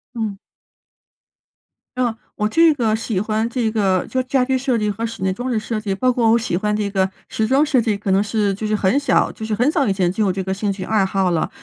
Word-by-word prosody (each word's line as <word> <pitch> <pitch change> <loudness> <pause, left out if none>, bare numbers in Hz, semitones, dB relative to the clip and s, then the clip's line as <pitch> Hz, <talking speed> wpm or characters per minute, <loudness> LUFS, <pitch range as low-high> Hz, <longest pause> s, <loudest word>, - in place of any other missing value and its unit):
嗯。 215 -4 -3 1.6
啊， 240 -3 0 0.2
我 210 - 0
这 330 +8 +5
个 225 -5 +1
喜 220 -3 -2
欢 220 +2 -1
这 235 -3 -1
个 195 -4 +1
就 260 - -1
家 255 0 +1
居 265 0 0
设 255 -2 0
计 210 -1 -1
和 225 +3 -6
室 225 -4 -4
内 190 0 +1
装 245 +5 -4
置 225 - 0
设 220 0 -3
计， 200 -2 -2
包 255 +4 +1
括 230 -2 +2
我 230 - +5
喜 225 -7 -2
欢 210 +3 0
这 205 -1 -2
个 190 -1 +1 0.2
时 220 0 -1
装 275 +4 +3
设 265 -5 +2
计 215 -3 0
可 200 -1 -2
能 195 +2 +3
是 205 -1 0
就 215 +2 -4
是 215 - +1
很 210 +7 +2
小， 285 - +2
就 220 - -10
是 220 -1 -1
很 250 +7 +2
早 285 - +1
以 - - +2
前 185 -2 +1
就 215 +3 -1
有 190 - +2
这 190 +1 -3
个 190 0 -2
兴 200 +1 -1
趣 190 -1 -5
爱 215 0 +1
好 190 -1 0
了。 165 - 0
215 Hz, 280 characters per minute, -20 LUFS, 195-240 Hz, 1.6 s, 这